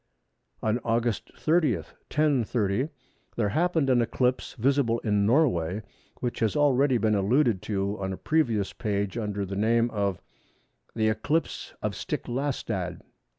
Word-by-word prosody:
On 110 +2 +1
Aug. 115 -2 0 0.2
30, 155 -7 +3
1030, 125 - 0 0.5
there 105 -3 +1
happened 160 - +1
an 125 -2 +4
eclipse 125 +2 0
visible 130 -1 +2
in 105 -2 +2
Norway, 105 - +2 0.4
which 120 - -2
has 110 -2 +1
already 140 -3 +3
been 110 -1 +2
alluded 105 +1 +2
to 100 -1 -2
on 95 -1 -2
a 95 - -4
previous 115 -11 +1
page 100 -3 -2
under 105 -3 -2
the 95 +1 -5
name 115 +3 +2
of 100 -4 -1 0.8
the 110 -1 +2
"eclipse 130 +10 -1
of - - -1
Stiklastad." 115 - -3
115 Hz, 130 wpm, -27 LUFS, 100-135 Hz, 0.8 s, an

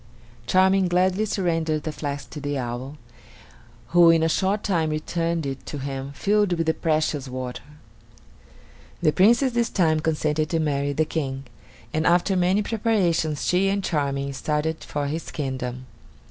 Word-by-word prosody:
Charming 190 0 +4
gladly 185 +4 +2
surrendered 165 -6 -1
the 155 - -3
flask 145 -3 -5
to 150 - -7
the 145 0 -2
owl, 125 +3 -5 0.9
who 170 -1 +6
in 165 -1 +4
a - - +3
short 195 +5 0
time 170 -6 +1
returned 165 +1 -2
it 135 -1 -5
to 145 - -5
him 135 0 -5
filled 205 +3 +1
with 165 -1 -1
the 160 - +2
precious 155 -4 0
water. 125 -1 -5 1.4
The 155 - +5
Princess 235 - +4
this 235 -1 0
time 160 -5 +2
consented 155 -1 0
to 165 - 0
marry 145 -2 0
the 155 +3 +1
King, 135 -4 -3 0.5
and 155 +1 +1
after 180 +3 +3
many 185 +3 +2
preparations 185 -9 0
she 185 +2 +2
and 200 0 -1
Charming 140 -4 -1
started 150 +3 -2
for 145 -1 -3
his 155 +4 -4
kingdom. 130 -3 -4
160 Hz, 155 wpm, -24 LUFS, 145-180 Hz, 1.4 s, who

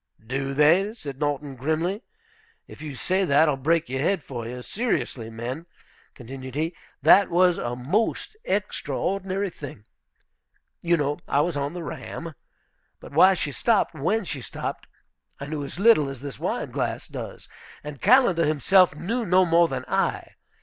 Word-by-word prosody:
"Do 135 +3 -3
they?" 175 +9 +4
said 140 - -8
Norton, 145 -2 -2
grimly. 160 - -1 0.7
"If - - -13
you 150 -3 -6
say 185 +8 0
that, 155 -2 +4
I'll 150 - +2
break 160 +5 +1
your 130 +1 -3
head 170 +3 +1
for 120 -3 -6
you. 125 +1 -7
Seriously, 165 - -2
men," 125 +9 -6 0.5
continued 130 +1 -9
he, 160 +3 -1 0.3
"that 185 +5 +7
was 180 0 +3
a 120 0 -3
most 200 - -1
extraordinary 195 - -2
thing. 135 -10 -10 1.0
You 170 0 +2
know 145 -1 -1
I 145 - +2
was 170 +1 -1
on 140 +2 -2
the 175 -1 -6
Ram. 165 +1 -7 0.7
But - - -12
why 185 +6 +6
she 150 -4 -2
stopped 200 - +1
when 180 +9 0
she 145 -6 -5
stopped - - -6 0.5
I 140 - -5
knew 150 0 -4
as 140 - -7
little 195 -9 +5
as 135 -2 -8
this 140 -3 -7
wineglass - - -3
does; - - -8 0.4
and 150 -2 -8
Callender 205 -7 +5
himself 170 +3 +4
knew 215 +11 -2
no 185 -2 +4
more 170 0 +4
than - - -4
I. - - -1
155 Hz, 160 wpm, -25 LUFS, 135-185 Hz, 1.0 s, that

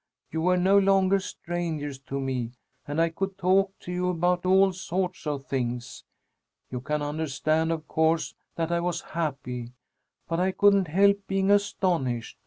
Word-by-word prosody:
You 160 - -2
were 180 +2 +3
no 190 +3 +5
longer 195 0 +4
strangers 165 -7 -4
to 140 - -3
me 125 -3 -2 0.3
and 145 +2 -2
I 165 0 +3
could 195 +3 -4
talk 195 +1 +2
to 180 - -7
you 180 0 0
about 180 +1 +1
all 190 +1 +5
sorts 185 -1 -3
of 140 -2 -3
things. 125 -2 -3 0.7
You 125 -1 -4
can 150 +2 -2
understand, 155 +2 0
of 160 -2 -3
course, 160 +1 +1 0.2
that 165 0 -1
I 170 - +2
was 175 0 -1
happy, 125 -7 -4 0.5
but 165 0 -1
I 185 +1 +1
couldn't 200 -2 +4
help 200 +5 +4
being 195 0 +1
astonished. 170 - 0
170 Hz, 160 wpm, -27 LUFS, 145-190 Hz, 0.7 s, no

